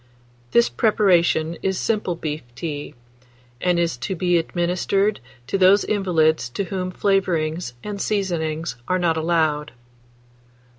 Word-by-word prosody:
This 120 -1 +4
preparation 170 - +2
is 190 -1 -1
simple 210 -5 -1
beef 155 -2 -4
tea, 145 +2 -5 0.7
and 180 -1 +2
is 170 -5 0
to 135 +10 -3
be 175 0 +2
administered 180 +5 0 0.3
to 195 +10 -2
those 190 +2 +6
invalids 160 -9 +1
to 200 - +1
whom 185 0 -3
flavourings 175 -8 0
and 205 -1 -5
seasonings 170 -7 -2
are 185 - +1
not 170 -3 +1
allowed. 160 -2 0
175 Hz, 120 wpm, -22 LUFS, 160-190 Hz, 0.7 s, those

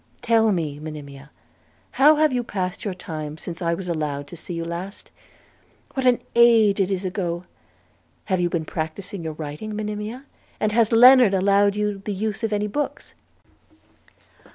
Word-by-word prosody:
Tell 225 -2 +3
me, 155 -6 -2
Monimia, 150 -2 -9 0.6
how 300 +3 +6
have 305 -2 +2
you 245 -1 0
passed 185 -5 -4
your 200 -4 -3
time 155 -3 -6
since 170 +1 -8
I 170 -1 0
was 185 +1 -7
allowed 150 -4 -2
to - - -9
see 175 +1 -7
you 165 0 -3
last? 175 +4 -7 0.8
What 265 -1 0
an 245 -1 +4 0.2
age 230 -4 +5
it 195 -1 +2
is 190 -1 -2
ago! 180 -2 -3 0.8
Have 185 -2 0
you 175 0 +1
practised 160 +3 -4
your 165 -5 -5
writing, 155 +8 -6
Monimia, 210 +4 -5 0.4
and 215 - +1
has 225 0 +2
Lennard 245 -2 +7
allowed 200 +1 +3
you 210 -1 -1
the 205 +1 -4
use 215 +2 -3
of 225 - 0
any 210 0 0
books?' 285 +8 -4
195 Hz, 160 wpm, -23 LUFS, 170-215 Hz, 0.8 s, Lennard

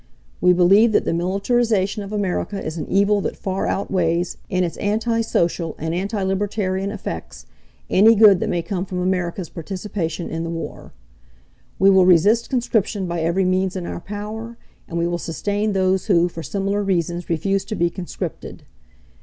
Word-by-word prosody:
"We 180 - +5
believe 195 +6 +5
that - - +3
the - - 0
militarization 200 +3 0
of 200 0 -7
America 200 0 -2
is 155 - -5
an 155 -4 -5
evil 200 +1 +2
that - - -3
far 190 0 -2
outweighs, 175 -3 0
in 185 0 +1
its 170 - -2
anti 225 +3 0
social 170 -6 -1
and 160 +1 -3
anti 200 +3 -2
libertarian 195 0 -1
effects, 205 -1 -7 0.4
any 220 +4 +6
good 205 -3 +7
that - - -2
may 170 - -1
come 180 +1 -3
from 185 -1 -5
America's 180 -1 -1
participation 175 -1 -4
in 165 0 -4
the 165 - -4
war. 165 0 -6 0.9
"We 195 +1 +5
will 190 -1 +5
resist 205 +7 +4
conscription 220 -5 0
by 170 -1 -3
every 170 +4 +1
means 185 +1 +1
in 180 -2 -4
our - - -5
power, 215 +4 -6 0.3
and 170 - -5
we 170 - +1
will 175 0 -2
sustain 205 +6 -2
those 190 -1 +1
who, 175 -4 +4
for 165 - -7
similar 200 +6 -1
reasons, 175 -3 -1
refuse 190 +4 0
to 215 - -4
be 170 -2 +1
conscripted. 185 -1 -6
190 Hz, 170 wpm, -21 LUFS, 175-205 Hz, 0.9 s, good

